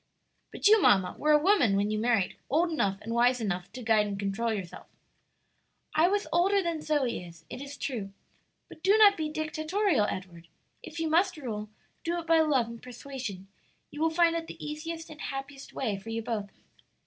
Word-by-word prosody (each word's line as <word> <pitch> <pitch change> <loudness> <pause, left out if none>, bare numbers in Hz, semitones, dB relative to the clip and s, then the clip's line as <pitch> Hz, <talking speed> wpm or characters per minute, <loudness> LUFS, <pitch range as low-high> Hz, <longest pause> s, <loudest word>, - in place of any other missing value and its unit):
"But - - +1
you, 435 0 +7
mamma, 190 - +4
were 305 - +2
a 300 - +7
woman 300 - +3
when 205 +1 +1
you 215 - -1
married, 225 -5 +1
old 335 +5 +2
enough 200 -11 0
and 230 - -4
wise 245 +2 +3
enough 185 -5 -3
to 255 - -7
guide 220 -2 +3
and 200 -1 -4
control 200 +4 -1
yourself." 195 -5 -6 1.1
"I 315 +3 +4
was 410 +2 0
older 380 +4 +3
than 335 -2 -2
Zoe 285 -10 0
is, 170 -1 -13
it - - -6
is 280 0 -8
true; 220 -8 -4 0.6
but - - -14
do 395 +4 +4
not 415 -2 +7
be 315 -3 -2
dictatorial, 310 - 0
Edward; 175 -3 -7 0.3
if 330 - -8
you 325 - 0
must 350 +3 +2
rule, 215 -7 -5 0.3
do 340 +1 -1
it 335 - -7
by 330 0 +4
love 290 -6 +3
and 235 0 -10
persuasion; 245 -6 -7 0.4
you 295 - -7
will 325 - +3
find 335 +1 +3
it 330 -1 -3
the - - -9
easiest 320 +2 -6
and 310 0 -11
happiest 270 0 -6
way 215 -7 -2
for 195 - -10
you 225 0 -3
both." 215 -4 -3
270 Hz, 195 wpm, -29 LUFS, 215-325 Hz, 1.1 s, you